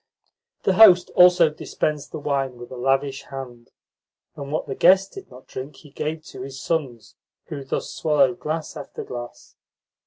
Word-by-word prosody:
The 195 - +2
host 185 -3 +7
also 180 -3 +6
dispensed 150 -1 -3
the - - -5
wine 135 -4 -2
with 120 0 -11
a - - -7
lavish 135 +2 0
hand, 125 -3 -9 0.7
and 140 0 -7
what 155 - -2
the 135 - -4
guests 190 +6 +4
did 195 - -10
not 125 +1 -14
drink 135 +2 -8
he 145 +1 -16
gave 155 +2 -4
to - - -10
his 135 0 -7
sons, 135 -9 -3 0.4
who 140 -2 -6
thus 135 - -4
swallowed 175 +3 +2
glass 155 +1 -4
after 145 -3 -7
glass. 120 -1 -9
145 Hz, 165 wpm, -23 LUFS, 135-165 Hz, 0.7 s, host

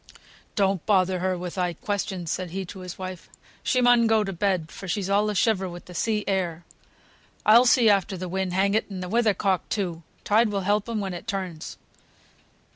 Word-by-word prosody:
"Don't 195 -3 +1
bother 185 -3 +3
her 185 0 0
with 175 0 -5
thy 180 -2 -1
questions," 190 -2 -3
said 185 -1 -3
he 190 +3 -4
to 190 +2 -10
his 180 -1 -8
wife. 185 -2 -7 0.3
"She 255 - +1
mun 245 -1 +5
go 220 -1 +3
to 195 -1 -4
bed, 180 -3 -1
for 195 - -9
she's 195 +1 -2
all 205 +1 +3
in 210 - -1
a - - -8
shiver 195 -2 +1
with 175 0 -10
the 180 - -11
sea 215 +3 0
air. 175 -4 -1 0.8
I'll 230 +4 +7
see 240 -1 +5
after 195 -2 +2
the 185 +1 -5
wind, 190 +1 -2
hang 195 +2 +2
it, 220 - 0
and 185 -2 -5
the 180 - -6
weather 225 -1 +2
cock, 190 -2 0
too. 175 -5 -2 0.2
Tide 220 +2 +3
will 200 -1 -1
help 205 +3 0
'em 220 -2 -1
when 190 -2 -3
it 175 +5 -8
turns." 185 -6 -5
195 Hz, 210 wpm, -25 LUFS, 180-210 Hz, 0.8 s, I'll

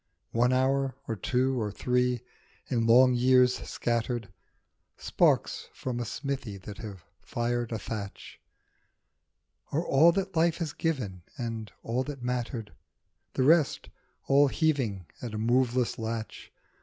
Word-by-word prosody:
One 120 +2 +3
hour, 135 0 +1
or 115 - -1
two, 125 +5 0
or 105 - -1
three, 125 +2 +1 0.4
in 115 -3 0
long 125 +2 +7
years 125 0 +4
scattered, 120 -2 -1 0.7
Sparks - - +1
from 125 -2 -3
a 120 - -2
smithy 125 -4 -4
that 100 +2 -9
have 100 -7 -8 0.2
fired 120 0 -2
a 115 - -1
thatch, 105 -1 -7 1.3
Are 160 +4 0
all 155 +5 +6
that 195 0 -2
life 165 0 +3
has 165 -5 -3
given 125 - -2 0.2
and 115 -3 -4
all 120 +3 -1
that 140 -4 -7
mattered; 120 -2 -3 0.6
The 130 - +1
rest, 155 +1 +3 0.4
all 140 +1 +5
heaving 130 - 0 0.2
at 115 -3 -5
a - - -2
moveless 120 +2 +1
latch. 110 0 -5
125 Hz, 130 wpm, -29 LUFS, 115-135 Hz, 1.3 s, long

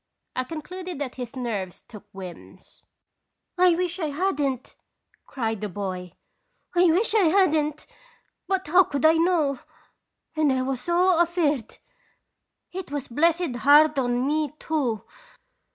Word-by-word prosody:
I 255 - -1
concluded 355 +4 -7
that 275 -3 -4
his 250 0 -7
nerves 210 -8 -4
took 210 -2 -12
whims. 185 -2 -12 0.8
"I 360 -2 +5
wish 355 +1 -2
I 320 - -1
hadn't! 285 -5 -2 0.5
cried 225 -5 -3
the 210 - -3
boy. 185 -2 -5 0.6
"I 350 +1 +5
wish 365 +7 +2
I 425 -4 +4
had'nt! 310 -5 +2 0.6
But 380 -1 0
how 360 +5 +5
could 285 -1 -2
I 315 - +7
know? 325 -5 +2 0.8
And 310 -3 +3
I 260 -1 0
was 260 -1 -2
so 350 +1 +3
afeard! 315 - 0 0.9
It 375 -3 -6
was 285 -1 -5
blessed 320 +1 +1
hard 290 +4 +5
on 245 0 0
me, 300 0 0
too 275 -10 -2
295 Hz, 135 wpm, -25 LUFS, 250-345 Hz, 0.9 s, I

